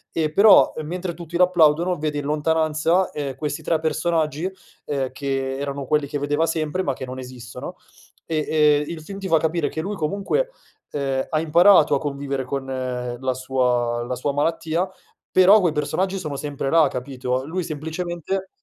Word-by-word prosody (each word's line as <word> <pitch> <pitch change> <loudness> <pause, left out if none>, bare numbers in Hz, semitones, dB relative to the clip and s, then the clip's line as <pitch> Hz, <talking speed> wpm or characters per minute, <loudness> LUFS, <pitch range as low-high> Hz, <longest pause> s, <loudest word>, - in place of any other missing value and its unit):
e 155 -2 0
però, 200 +5 +7
mentre 175 +3 -4
tutti 170 0 -5
lo 180 - +7
applaudono, 175 0 +3
vede 150 -1 -2
in 145 - -5
lontananza, 160 +4 +1
ehm, 140 -3 -4
questi 145 +1 -4
3 165 - +1
personaggi, 160 +1 0 0.3
ehm, 135 -3 -2
che 135 0 -2
erano 140 0 -4
quelli 150 -1 +1
che 145 - -3
vedeva 145 +3 +1
sempre, 160 +2 -1
ma 140 - 0
che 130 - -8
non 130 0 -7
esistono 125 +5 -8 0.5
e, 155 -2 -1 0.4
ehm, - - -6
il 165 -2 -6
film 195 +3 -8
ti 195 - -4
fa 165 -3 +4
capire 160 0 0
che 160 - -4
lui 200 +4 -4
comunque, 200 - -1 0.4
ehm, 135 -2 -1
ha 155 - +1
imparato 170 +1 +5
a - - +1
convivere 140 -2 -3
con 135 +1 -3
la 130 -1 -3
sua 125 -2 0
la 125 +1 -3
sua 140 +3 -1
malattia, 165 +4 0 0.4
però 190 +3 +7
quei 175 -5 +1
personaggi 185 +6 -1
sono 155 -5 -4
sempre 140 -1 -3
là 165 +1 +5
capito? 125 0 -3
Lui 180 +4 -3
semplicemente 175 +4 -4
150 Hz, 175 wpm, -22 LUFS, 135-170 Hz, 0.5 s, però